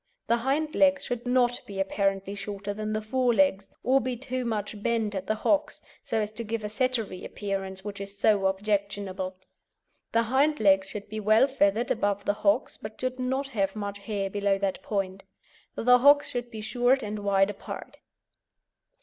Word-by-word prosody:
The 235 - +2
hind 280 +6 0
legs 280 -1 +3
should 245 0 -4
not 245 -1 +2
be 200 -1 -6
apparently 195 0 0
shorter 205 0 -5
than 215 +1 -4
the 215 0 -2
fore 245 +2 +1
legs, 210 -9 +2
or 265 +3 +4
be 250 0 -3
too 255 0 -4
much 210 -2 -3
bent 225 -2 0
at 190 -1 -4
the 215 - +1
hocks, 295 +7 0 0.2
so 225 - -1
as 210 -1 -2
to 225 +2 -6
give 225 0 -3
a 210 - -3
Settery 225 -5 -1
appearance 195 -1 -4
which 200 -1 -6
is 200 0 -7
so 200 -2 +3
objectionable. 195 -1 -2 0.8
The 230 0 +3
hind 275 +6 +2
legs 195 -2 +4
should 205 -1 -7
be 215 +1 -5
well 215 +4 +5
feathered 235 -4 +1
above 200 -2 0
the 205 - +2
hocks, 205 +4 +2
but 215 +1 -9
should 255 0 -3
not 265 +2 -1
have 195 -6 -1
much 200 -1 -4
hair 200 -1 -2
below 200 -1 +1
that 195 -1 -2
point. 195 -2 -3 0.5
The 250 +1 +5
hocks 285 +2 +6
should 245 -1 -3
be 220 -2 -7
short 245 +4 +2
and 210 0 -4
wide 200 0 +2
apart. 200 - -9
215 Hz, 185 wpm, -27 LUFS, 200-245 Hz, 0.8 s, hocks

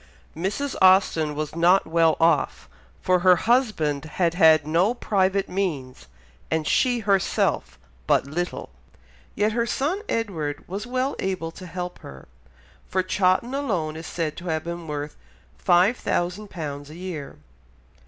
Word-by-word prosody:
Mrs. 200 - -2
Austen 185 -5 +4
was 155 +1 -4
not 175 +3 +4
well 165 0 +2
off, 165 -2 +1 0.4
for 185 0 +3
her 180 0 +6
husband 175 - +1
had 165 +2 0
had 160 -4 +5
no 175 +9 +2
private 195 -4 +1
means 140 - -3 0.4
and 160 -1 0
she 245 - +2
herself 200 -3 0 0.3
but - - +3
little, 165 - -4 0.6
yet 210 +1 +1
her 235 +1 0
son 315 +12 -1
Edward 160 -10 -3
was 200 +6 -5
well 255 +2 -1
able 185 -4 -2
to 185 +2 -11
help 180 +1 -6
her, 65 -1 -12 0.6
for 185 0 0
Chawton 185 +6 +1
alone 185 - -2
is 160 +1 -7
said 160 -3 -3
to 175 - -8
have 160 -2 -1
been 170 -1 -6
worth 150 0 -5 0.5
£5000 175 - 0
a 155 - -11
year. 170 -5 -7
175 Hz, 135 wpm, -24 LUFS, 155-200 Hz, 0.6 s, her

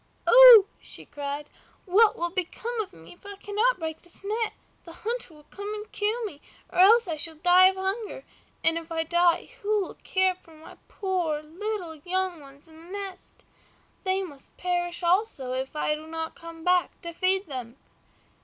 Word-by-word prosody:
"Oh!" - - +10 0.2
she - - -6
cried, 285 0 -5 0.4
"what 420 +3 +4
will 345 0 -2
become 440 +6 -3
of 410 - -7
me 160 0 -14
if 350 - -24
I 405 0 -9
cannot 420 +5 0
break 320 -2 -5
this 350 +2 -7
net? 440 +2 -1 0.3
The 335 - -12
hunter 470 -4 -3
will 300 -1 -17
come 405 +1 -6
and 425 0 -8
kill 440 +3 -1
me, 290 -8 -8 0.3
or - - -3
else 445 +4 +7
I 320 -2 -3
shall 320 +1 0
die 355 +3 +6
of 380 - +1
hunger, 395 +5 -4 0.4
and 325 +1 +2
if 330 0 -14
I 325 0 0
die 345 +1 +2
who 420 0 +1
will - - -8
care 375 0 +1
for 330 -3 -20
my 310 - -14
poor 350 -6 -2
little 360 +2 -5
young 365 +2 -2
ones 280 +1 -16
in 320 0 -15
the - - -13
nest? 395 -2 -4 0.6
They 380 0 +1
must 290 -7 -12
perish 350 -1 -2
also 345 - +1
if 265 +3 -4
I 300 0 0
do 310 +1 -7
not 320 0 -5
come 330 -1 -11
back 360 0 +1
to 340 0 -6
feed 375 +3 +2
them." 255 -5 -7
360 Hz, 185 wpm, -26 LUFS, 320-405 Hz, 0.6 s, Oh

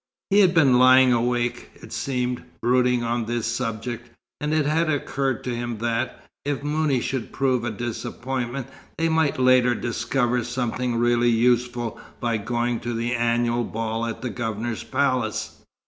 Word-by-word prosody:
He 200 - +5
had 185 -3 +5
been 135 -6 +5
lying 130 0 +7
awake, 120 0 0
it - - -12
seemed, 125 -2 -2 0.2
brooding 125 0 +2
on 120 0 -1
this 120 0 -2
subject, 120 0 -3 0.3
and 150 0 -2
it 155 -2 +2
had 155 +2 +1
occurred 135 -4 -1
to 125 -1 -2
him 120 -1 -3
that, 115 +2 -2 0.2
if 145 -1 -2
Mouni 150 -2 +1
should 130 0 -3
prove 130 -3 +1
a 120 - -1
disappointment, 120 +3 -4 0.3
they 165 0 +1
might 160 -3 +2
later 125 -1 +4
discover 120 +1 0
something 125 0 -2
really 120 0 +3
useful 120 0 +1 0.2
by 115 -2 0
going 120 +2 -1
to 120 0 -4
the 120 +2 -1
annual 120 0 +1
ball 115 +1 -3
at 115 - -6
the 125 - -2
Governor's 115 0 -3
palace. 130 -6 -1
120 Hz, 155 wpm, -24 LUFS, 120-130 Hz, 0.3 s, lying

